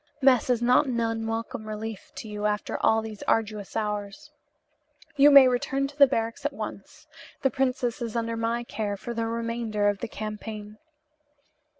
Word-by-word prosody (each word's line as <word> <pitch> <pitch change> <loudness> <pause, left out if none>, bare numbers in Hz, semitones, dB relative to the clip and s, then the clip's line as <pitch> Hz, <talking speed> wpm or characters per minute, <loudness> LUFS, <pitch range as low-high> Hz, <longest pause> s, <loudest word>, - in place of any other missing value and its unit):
Mess 260 -3 +4
is 240 -1 +2
not 250 +4 +4
an 240 -2 -1
unwelcome 225 -1 -3
relief 215 -1 -6
to - - -7
you 210 0 -2
after 210 0 -2
all 225 0 +3
these 215 -2 -8
arduous 215 -3 -1
hours. 210 +7 -4 0.8
You 285 0 +7
may 275 -2 +9
return 270 +2 0
to 280 - -13
the 280 -1 +7
barracks 230 -3 -2
at 290 0 -1
once. 280 +6 -8 0.4
The 270 - +3
princess 255 -1 -1
is 230 -1 -4
under 230 0 -1
my 230 +1 -1
care 210 -3 -3
for 235 +4 -6
the 230 -1 -2
remainder 230 -2 -1
of 205 -1 -2
the 235 - -4
campaign." 215 -1 -7
230 Hz, 170 wpm, -26 LUFS, 215-250 Hz, 0.8 s, may